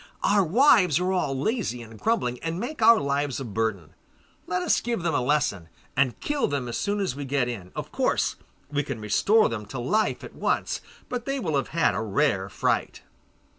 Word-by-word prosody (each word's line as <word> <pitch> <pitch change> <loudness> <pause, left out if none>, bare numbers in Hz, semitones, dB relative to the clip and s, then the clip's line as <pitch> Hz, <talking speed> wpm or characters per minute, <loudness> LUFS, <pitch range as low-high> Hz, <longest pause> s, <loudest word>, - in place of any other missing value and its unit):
Our 200 0 +4
wives 185 - +5
are 180 +1 0
all 140 -7 0
lazy 185 - -1
and 110 -1 -13
grumbling, 125 - 0
and 165 +1 -3
make 250 +4 -5
our 230 +1 +7
lives 140 -1 -1
a 135 - -5
burden. 110 -6 -2 0.5
Let 180 0 -1
us - - +2
give 235 -6 -2
them 170 -2 0
a - - +2
lesson, 125 - 0 0.3
and 130 -2 +1
kill 290 -1 0
them 140 -3 -2
as 120 - -4
soon 205 - -1
as 190 -10 -1
we 145 - -5
get 135 -2 0
in. 100 -7 -6
Of - - -5
course - - +1 0.4
we 145 0 +1
can 135 -5 -5
restore 205 - +3
them 105 -3 -5
to 135 - -7
life 210 - 0
at - - -9
once, - - -1 0.3
but 245 -1 -4
they 275 0 -1
will 160 - -1
have 135 - 0
had 165 0 +2
a - - -2
rare 110 -3 +1
fright. - - -1
145 Hz, 205 wpm, -26 LUFS, 120-205 Hz, 0.5 s, our